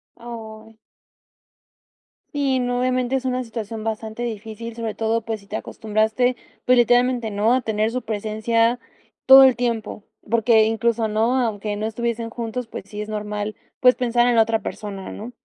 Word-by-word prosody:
Ay. 225 -2 -10 1.6
Sí, 275 -3 +1
no, 245 0 -1
obviamente 255 0 0
es 265 0 -2
una 255 0 -1
situación 225 -2 -6
bastante 220 +1 -4
difícil, 225 0 -6
sobre 225 -2 -4
todo, 225 +1 0
pues 225 -1 -4
si - - -19
te 205 +2 -7
acostumbraste, 220 +4 0 0.3
pues 250 0 +5
literalmente, 245 0 +3
¿no? 210 +3 +2
A 255 - +2
tener 220 -1 0
su 255 - -2
presencia 225 +2 0 0.5
todo 270 0 +11
el 260 -3 +6
tiempo, 230 -4 -3 0.2
porque 225 0 +4
incluso, 225 0 +1
¿no? 220 +4 +1
Aunque 215 -3 -2
no 210 +1 -3
estuviesen 230 0 -3
juntos, 235 +1 -4
pues - - -8
sí, 210 0 -6
es - - -10
normal, 210 0 -4 0.2
pues, 250 0 +6
pensar 240 -1 +1
en 240 - +3
la 225 - +6
otra 225 0 +1
persona, 195 -3 -6
¿no? 225 +4 -8
225 Hz, 165 wpm, -22 LUFS, 215-245 Hz, 1.6 s, todo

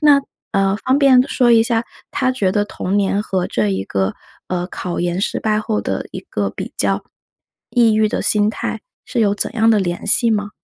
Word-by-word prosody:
那， 290 -2 +5 0.3
呃， 195 0 +2
方 260 +4 +1
便 260 -3 +6
说 240 -2 +3
一 225 -1 +6
下， 230 -1 0 0.3
他 260 -2 0
觉 200 -7 0
得 205 +2 +1
童 195 -1 -3
年 200 +1 +1
和 185 -4 -1
这 110 -2 0
一 95 0 -2
个， 95 -1 -1 0.3
呃， 180 -1 -2
考 180 -1 -5
研 175 +1 -1
失 - - -1
败 215 -1 0
后 215 -1 -1
的 - - -3
一 - - -6
个 - - -3
比 - - -7
较， - - 0 0.7
抑 230 -3 +4
郁 215 0 +3
的 - - -2
心 210 0 +3
态 220 0 -4 0.2
是 245 - -2
有 205 -2 +3
怎 205 - -1
样 225 -1 +3
的 215 - +4
联 175 -2 -2
系 235 -2 +4
吗？ 205 -1 -2
210 Hz, 225 characters per minute, -18 LUFS, 190-230 Hz, 0.7 s, 便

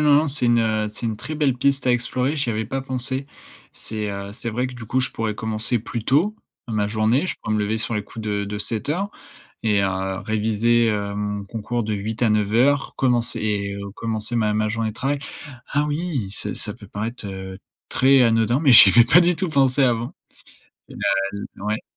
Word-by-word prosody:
non, 150 +1 +4
c'est 135 -3 +3
une, 120 0 +4
heu, 110 -1 0
c'est 110 +2 -3
une 110 -2 -2
très 155 +8 -6
belle 145 -4 +1
piste 140 0 +1
à 125 - +4
explorer, 125 +4 0
j'y 135 -4 0
avais 110 0 -2
pas 135 +5 -3
pensé. 130 +1 -1 0.5
C'est, 105 -2 -4
heu, 100 0 -5
c'est 115 +2 -4
vrai 125 +3 -1
que, 125 - -8
du 115 -2 -9
coup, 130 +4 +1
je 125 - 0
pourrais 110 -2 -2
commencer 110 +2 -1
plus 115 0 -6
tôt 180 +11 +2 0.3
ma 105 -2 0
journée. 110 - +1
Je - - -2
pourrais 110 - -2
me - - +1
lever 110 +2 -1
sur 115 - -1
les 105 - -1
coups 110 +2 -9
de 100 -1 -1
de 105 +1 -5
7:00 150 - 0 0.5
et 105 -3 +2
heu, 95 0 -1
réviser, 110 +2 +1
heu, 100 -1 -3
mon 105 -1 -3
concours 115 +3 -3
de 110 0 -2
8 110 +3 -4
à 115 - +4
9:00 115 +7 +2
commencer 120 -3 +1
et 100 -2 -1 0.2
commencer 115 +1 -3
ma 105 -2 +1
ma 110 0 +1
journée 110 0 -1
de - - -8
travail. 140 +4 -1 0.5
Ah 145 +1 0
oui, 145 - -2
ça 100 - -2
ça - - -2
peut - - -14
paraître, 110 +2 -5
heu, 95 -1 -7 0.3
très 135 0 +4
anodin 115 +2 +3
mais 145 -5 +4
j'y 105 -4 +10
avais 120 +3 +6
pas 170 +8 +6
du 175 0 +2
tout 180 0 -2
pensé 135 -2 +3
avant 120 -1 0 0.8
et - - -11
bah - - -9 0.3
l 100 -1 -8
ouais. 105 +1 -2
115 Hz, 215 wpm, -22 LUFS, 105-130 Hz, 0.8 s, j'y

